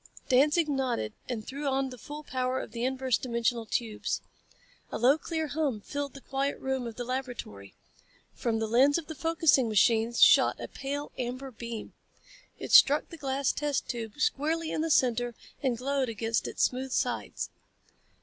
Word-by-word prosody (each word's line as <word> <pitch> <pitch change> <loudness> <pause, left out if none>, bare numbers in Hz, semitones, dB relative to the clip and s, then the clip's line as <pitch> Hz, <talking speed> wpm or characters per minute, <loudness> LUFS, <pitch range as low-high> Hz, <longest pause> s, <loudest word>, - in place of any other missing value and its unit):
Danzig 295 +5 +4
nodded 260 - -1 0.2
and 225 -4 -3
threw 280 +2 -4
on 270 -1 0
the 250 - -8
full 295 +6 -8
power 255 -2 -1
of - - -7
the 235 +1 -4
inverse 260 -2 0
dimensional 235 -2 -1
tubes. 220 -1 -2 0.7
A - - -2
low 255 +5 +5
clear 320 -2 -3
hum 285 -8 -1
filled 285 +5 -5
the 275 - -10
quiet 275 +2 -2
room 265 -2 -2
of 230 - -7
the 245 - -4
laboratory. 245 - -5 0.6
From 230 -2 -1
the 225 - 0
lens 260 +7 +4
of 335 - -4
the 315 - -6
focusing 320 -5 +3
machine 225 +2 +3
shot - - +6
a - - -5
pale, 285 +2 -5
amber 255 +2 -4
beam. 230 -1 -7 0.6
It - - -6
struck 290 +1 +7
the 330 - -9
glass 275 -2 0
test 295 -2 -1
tube 225 -3 -4
squarely 315 +3 0
in - - -1
the 325 - -1
center 245 -4 +2 0.3
and 255 -5 0
glowed 270 0 0
against 225 +1 -1
its - - -1
smooth 260 +1 0
sides. - - -2
260 Hz, 170 wpm, -29 LUFS, 235-285 Hz, 0.7 s, struck